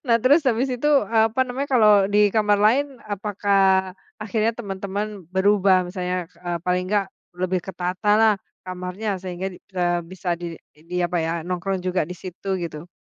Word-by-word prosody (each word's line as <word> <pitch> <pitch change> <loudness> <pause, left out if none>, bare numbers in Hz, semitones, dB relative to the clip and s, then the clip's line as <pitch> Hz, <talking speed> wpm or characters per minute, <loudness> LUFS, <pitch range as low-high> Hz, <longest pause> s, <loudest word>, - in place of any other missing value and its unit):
Nah, 230 -1 +5
terus 285 +6 +5
habis 245 +3 +1
itu, 295 +5 0 0.3
apa 225 +3 +3
namanya, 265 +3 -3
kalau 215 -3 +6 0.2
di 205 - +4 0.2
kamar 210 -1 +3
lain 270 +6 +3 0.3
apakah 200 0 0 0.6
akhirnya 220 +1 0
teman-teman 200 -1 -3 0.3
berubah 195 -1 +4
misalnya, 180 0 -3 0.3
eee, 175 -1 -2
paling 180 0 +1
enggak 205 -1 +2 0.4
lebih 185 0 0
ketatalah 205 +4 +2 0.3
kamarnya 185 +3 -5
sehingga, 185 0 -4 0.3
eee, 175 0 +2
bisa 185 -1 -7
di 175 - -4 0.4
diapa 180 0 0
ya, - - -1 0.2
nongkrong 185 +1 -2
juga 185 0 +1
di - - -4
situ 185 +1 -8
gitu? 165 0 -6
195 Hz, 150 wpm, -23 LUFS, 180-215 Hz, 0.6 s, kalau